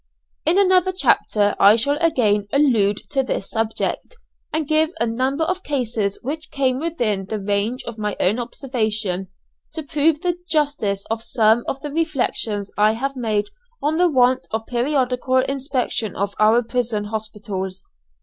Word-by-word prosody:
In 340 Hz, +4 st, +4 dB
another 375 Hz, -2 st, +4 dB
chapter 210 Hz, -, +2 dB
I 205 Hz, +2 st, +7 dB
shall 280 Hz, +6 st, +1 dB
again 210 Hz, -11 st, +2 dB
allude 225 Hz, -8 st, +3 dB
to 270 Hz, -, +2 dB
this 255 Hz, -6 st, -3 dB
subject, 225 Hz, -, -2 dB, 0.4 s
and 310 Hz, -2 st, -1 dB
give 310 Hz, +1 st, +3 dB
a -, -, +2 dB
number 260 Hz, +6 st, 0 dB
of 370 Hz, +3 st, -1 dB
cases 235 Hz, -, -1 dB
which 310 Hz, +5 st, -4 dB
came 260 Hz, -2 st, 0 dB
within 240 Hz, -, -1 dB
the 215 Hz, +2 st, -4 dB
range 205 Hz, +5 st, -1 dB
of 230 Hz, -2 st, -7 dB
my 210 Hz, -2 st, -2 dB
own 205 Hz, +6 st, +2 dB
observation, 220 Hz, -7 st, -2 dB, 0.5 s
to 320 Hz, -, -4 dB
prove 300 Hz, +2 st, +1 dB
the 355 Hz, -2 st, 0 dB
justice 285 Hz, -11 st, 0 dB
of 225 Hz, 0 st, -1 dB
some 225 Hz, 0 st, +2 dB
of 270 Hz, -, -2 dB
the 295 Hz, -, -5 dB
reflections 260 Hz, -10 st, -1 dB
I 215 Hz, +1 st, +5 dB
have 275 Hz, +4 st, -3 dB
made 215 Hz, -5 st, 0 dB, 0.3 s
on 305 Hz, +2 st, 0 dB
the 355 Hz, 0 st, +4 dB
want 255 Hz, -3 st, +3 dB
of 220 Hz, 0 st, -3 dB
periodical 255 Hz, 0 st, 0 dB
inspection 260 Hz, -5 st, -1 dB
of 200 Hz, +1 st, -2 dB
our 220 Hz, +3 st, +5 dB
prison 230 Hz, -3 st, -1 dB
hospitals. 210 Hz, -3 st, -5 dB
245 Hz, 155 wpm, -21 LUFS, 215-290 Hz, 0.5 s, I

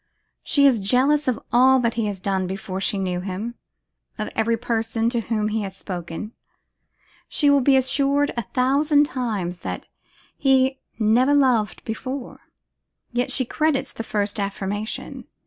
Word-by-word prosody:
She 285 Hz, -1 st, +3 dB
is 260 Hz, -5 st, +5 dB
jealous 265 Hz, +8 st, +2 dB
of 255 Hz, -, +1 dB
all 260 Hz, +2 st, +6 dB
that 235 Hz, -1 st, +1 dB
he 230 Hz, -2 st, -1 dB
has 200 Hz, -2 st, -4 dB
done 190 Hz, -1 st, -1 dB
before 190 Hz, 0 st, -5 dB
she 200 Hz, -, 0 dB
knew 185 Hz, -2 st, -1 dB
him; 200 Hz, +5 st, -4 dB, 0.6 s
of 215 Hz, -, -4 dB
every 230 Hz, +1 st, +1 dB
person 225 Hz, -1 st, -1 dB
to 240 Hz, -, 0 dB
whom 215 Hz, -1 st, -1 dB
he 220 Hz, +1 st, -1 dB
has 195 Hz, -1 st, -6 dB
spoken. 180 Hz, +2 st, -6 dB, 1.0 s
She 290 Hz, -2 st, +3 dB
will 280 Hz, -1 st, +4 dB
be 270 Hz, +1 st, +4 dB
assured 280 Hz, +2 st, +2 dB
a 235 Hz, -, 0 dB
thousand 285 Hz, +3 st, +3 dB
times 210 Hz, -, -3 dB
that -, -, -6 dB, 0.5 s
he 265 Hz, -1 st, +2 dB, 0.2 s
never 240 Hz, +6 st, +3 dB
loved 250 Hz, -7 st, +2 dB
before, 255 Hz, +4 st, -5 dB, 0.7 s
yet 245 Hz, +1 st, 0 dB
she 260 Hz, -, +2 dB
credits 280 Hz, 0 st, 0 dB
the -, -, -5 dB
first 210 Hz, -1 st, -2 dB
affirmation. 200 Hz, +2 st, -4 dB
230 Hz, 150 wpm, -23 LUFS, 205-265 Hz, 1.0 s, all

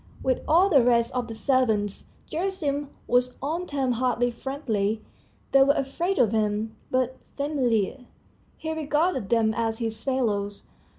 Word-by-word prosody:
With 260 Hz, -1 st, +1 dB
all 345 Hz, +5 st, +5 dB
the 295 Hz, -9 st, +5 dB
rest 235 Hz, -1 st, +3 dB
of 250 Hz, -2 st, -1 dB
the 225 Hz, -, -6 dB
servants, 220 Hz, -6 st, +1 dB, 0.2 s
Gerasim 310 Hz, -6 st, -2 dB, 0.2 s
was 245 Hz, +1 st, +2 dB
on 325 Hz, +7 st, -3 dB
terms 265 Hz, -4 st, 0 dB
hardly 245 Hz, -1 st, +1 dB
friendly 225 Hz, -5 st, -2 dB, 0.5 s
they 275 Hz, -, +6 dB
were 280 Hz, +2 st, +5 dB
afraid 335 Hz, +8 st, -1 dB
of 225 Hz, -4 st, +4 dB
him 215 Hz, 0 st, 0 dB
but 255 Hz, 0 st, 0 dB, 0.2 s
familiar; 255 Hz, -4 st, 0 dB, 0.5 s
he 320 Hz, -, -4 dB
regarded 300 Hz, -, 0 dB
them 225 Hz, -2 st, +3 dB
as 225 Hz, 0 st, -1 dB
his 225 Hz, -2 st, -3 dB
fellows. 210 Hz, -7 st, -1 dB
255 Hz, 140 wpm, -26 LUFS, 225-285 Hz, 0.5 s, they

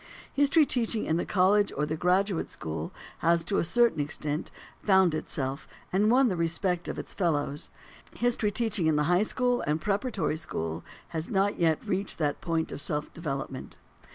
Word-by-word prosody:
History 285 Hz, +2 st, +4 dB
teaching 230 Hz, -4 st, +1 dB
in 160 Hz, -, +1 dB
the -, -, -2 dB
college 200 Hz, +2 st, +3 dB
or 150 Hz, -, +1 dB
the 155 Hz, -, -2 dB
graduate 185 Hz, +2 st, +1 dB
school 80 Hz, 0 st, -5 dB, 0.3 s
has, 170 Hz, 0 st, +3 dB
to 195 Hz, +4 st, 0 dB
a -, -, +2 dB
certain 235 Hz, 0 st, +3 dB
extent, 150 Hz, +1 st, -2 dB, 0.3 s
found 190 Hz, -4 st, +4 dB
itself, 140 Hz, -3 st, -3 dB, 0.3 s
and 205 Hz, +3 st, +3 dB
won 255 Hz, +2 st, +5 dB
the 190 Hz, -, 0 dB
respect 170 Hz, +1 st, -1 dB
of -, -, -4 dB
its -, -, -6 dB
fellows; 150 Hz, -5 st, -1 dB, 0.5 s
history 240 Hz, -3 st, +1 dB
teaching 205 Hz, -5 st, +1 dB
in 155 Hz, -, +3 dB
the 150 Hz, -, +2 dB
high 175 Hz, +4 st, +3 dB
school 245 Hz, +2 st, +1 dB
and 150 Hz, +1 st, 0 dB
preparatory 200 Hz, -, -1 dB
school 80 Hz, -, -4 dB, 0.3 s
has 160 Hz, -1 st, -4 dB
not 195 Hz, +1 st, +1 dB
yet 160 Hz, +1 st, +2 dB
reached 195 Hz, -1 st, -2 dB
that 150 Hz, -3 st, -1 dB
point 165 Hz, -2 st, -1 dB
of -, -, -5 dB
self 150 Hz, 0 st, -3 dB
development. 135 Hz, -5 st, -5 dB
175 Hz, 175 wpm, -28 LUFS, 155-205 Hz, 0.5 s, won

